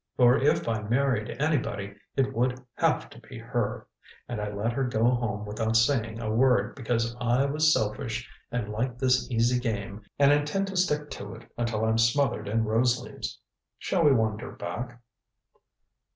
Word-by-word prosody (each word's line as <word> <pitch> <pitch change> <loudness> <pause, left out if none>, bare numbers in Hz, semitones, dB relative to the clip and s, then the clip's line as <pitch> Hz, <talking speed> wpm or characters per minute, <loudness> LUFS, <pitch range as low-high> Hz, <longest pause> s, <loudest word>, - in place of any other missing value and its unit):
For 125 -1 +6
if 140 +1 +2
I 110 -2 0
married 120 0 0
anybody 115 -10 -1 0.2
it 135 0 +1
would 125 +2 +1
have - - +1
to - - -12
be - - -11
her - - -3 0.4
and 120 -3 -4
I 105 0 -3
let 105 +3 -1
her 135 +2 0
go 120 -3 0
home 115 -4 +1
without 110 +2 0
saying 115 -2 +1
a 110 -2 -2
word 120 -2 +3
because 115 -2 -1
I 125 +3 +2
was 155 +2 +3
selfish 115 0 -1 0.2
and 120 -3 -2
like 120 +3 -2
this 125 0 +2
easy 120 +1 +2
game 105 -4 -3 0.2
and 140 0 +5
intend 150 +7 +1
to 195 - -6
stick 150 -5 0
to 100 +2 -7
it 115 +1 -15
until 115 -2 -1
I'm 110 0 +2
smothered 115 -2 +2
in 110 +2 +1
rose 120 +3 +2
leaves. - - -7 0.4
Shall 175 - 0
we 150 - +6
wander 110 0 0
back?" 120 0 -6
120 Hz, 170 wpm, -27 LUFS, 110-130 Hz, 0.4 s, For